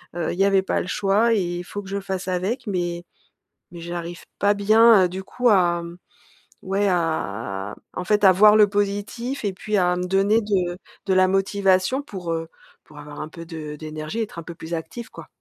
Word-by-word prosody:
Heu, 170 Hz, -2 st, -2 dB
il 180 Hz, -, -8 dB
y -, -, +5 dB
avait 195 Hz, -1 st, +4 dB
pas -, -, -1 dB
le -, -, -6 dB
choix 210 Hz, +4 st, +2 dB
et 215 Hz, -, +2 dB
il 175 Hz, 0 st, -4 dB
faut 205 Hz, +3 st, -6 dB
que -, -, -12 dB
je 200 Hz, 0 st, -2 dB
fasse 190 Hz, -1 st, -5 dB
avec, 210 Hz, +7 st, -2 dB
mais 175 Hz, -2 st, -2 dB, 0.7 s
mais 170 Hz, -1 st, -10 dB
j'arrive 170 Hz, 0 st, -6 dB, 0.2 s
pas 205 Hz, 0 st, +3 dB
bien, 215 Hz, 0 st, +6 dB
heu, 180 Hz, -, +1 dB
du 190 Hz, +2 st, -6 dB
coup 245 Hz, +4 st, 0 dB
à, 175 Hz, -4 st, +3 dB
mmh, 170 Hz, +1 st, -9 dB, 0.7 s
ouais, 195 Hz, +2 st, 0 dB
à, 105 Hz, -, -2 dB, 0.2 s
en 180 Hz, -, -4 dB
fait, 210 Hz, +1 st, +1 dB
à 190 Hz, -, +8 dB
voir 210 Hz, +3 st, +6 dB
le 210 Hz, -1 st, +6 dB
positif 205 Hz, +5 st, -2 dB
et 195 Hz, -, -1 dB
puis 210 Hz, +2 st, -2 dB
à 180 Hz, -1 st, +2 dB
me 180 Hz, 0 st, -2 dB
donner 195 Hz, +4 st, +3 dB
de 185 Hz, -4 st, -1 dB, 0.3 s
de 190 Hz, -, +1 dB
la 185 Hz, 0 st, +5 dB
motivation 195 Hz, +4 st, +1 dB
pour, 185 Hz, -, -5 dB
heu, 165 Hz, 0 st, -4 dB, 0.3 s
pour 150 Hz, -, -17 dB
avoir 145 Hz, 0 st, -9 dB
un 155 Hz, -, -6 dB
peu 165 Hz, 0 st, -10 dB
de 155 Hz, -3 st, -7 dB
d'énergie 155 Hz, +6 st, -6 dB
et 225 Hz, -, +1 dB
être 205 Hz, -, -10 dB
un -, -, -7 dB
peu 170 Hz, -, -8 dB
plus 160 Hz, +1 st, -8 dB
active 225 Hz, +8 st, -6 dB
quoi. -, -, -11 dB
185 Hz, 220 wpm, -23 LUFS, 170-205 Hz, 0.7 s, à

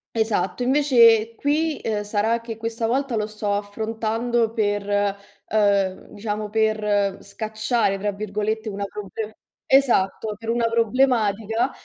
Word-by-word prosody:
Esatto, 220 Hz, -1 st, 0 dB
invece, 235 Hz, -5 st, +5 dB
qui, 305 Hz, +2 st, 0 dB
uhm, 210 Hz, -2 st, -1 dB
sarà 220 Hz, +3 st, 0 dB
che 225 Hz, -1 st, -7 dB
questa 230 Hz, 0 st, -2 dB
volta 260 Hz, 0 st, 0 dB
lo 210 Hz, 0 st, 0 dB
sto 210 Hz, -1 st, -2 dB
affrontando 225 Hz, +3 st, -1 dB
per, 205 Hz, -3 st, 0 dB, 0.6 s
uhm, 200 Hz, -3 st, +1 dB
diciamo, 210 Hz, 0 st, -4 dB
per 210 Hz, -2 st, +1 dB
"scacciare", 215 Hz, -1 st, -1 dB
tra 205 Hz, +1 st, -1 dB
virgolette, 215 Hz, +2 st, -3 dB
una 200 Hz, 0 st, -4 dB
proble 210 Hz, +2 st, -6 dB, 0.3 s
esatto, 220 Hz, -5 st, +2 dB
per 225 Hz, +1 st, -4 dB
una 235 Hz, -1 st, +1 dB
problematica, 230 Hz, -1 st, +1 dB
220 Hz, 120 wpm, -23 LUFS, 205-230 Hz, 0.6 s, invece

